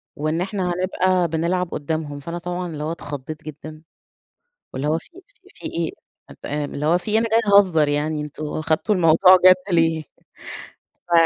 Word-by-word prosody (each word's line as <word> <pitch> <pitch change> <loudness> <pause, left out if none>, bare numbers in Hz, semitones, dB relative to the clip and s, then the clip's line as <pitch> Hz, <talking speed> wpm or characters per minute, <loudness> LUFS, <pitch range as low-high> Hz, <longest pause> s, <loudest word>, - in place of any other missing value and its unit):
وإن 155 +3 -2
إحنا 185 -2 -2
هنبقى 185 0 +1
بنلعب 170 +3 -1
قدامهم، 150 -1 -4
فأنا 170 +4 -6
طبعًا 180 +1 -4
اللي 150 -2 -6
هو 160 - -2
اتخضيت 145 -1 -7
جدًا 155 +1 -10 0.9
واللي 135 +3 -3
هو 160 +2 +1
في - - -17 0.4
في - - -10
إيه 165 -1 -2 0.5
آآ، 150 0 -2
اللي 145 +1 -4
هو 175 +3 +3
في 210 - -6
إيه! 220 - +3
أنا 230 - +1
جاية 215 -3 +4
اهزر 165 -7 +3
يعني 150 +1 -1
أنتم 150 +1 -6
أخدتوا 155 +7 -1
الموضوع 180 +2 +6
جد 185 0 +4
ليه 165 -1 +2 1.0
ف - - -15
165 Hz, 165 wpm, -21 LUFS, 155-180 Hz, 1.0 s, الموضوع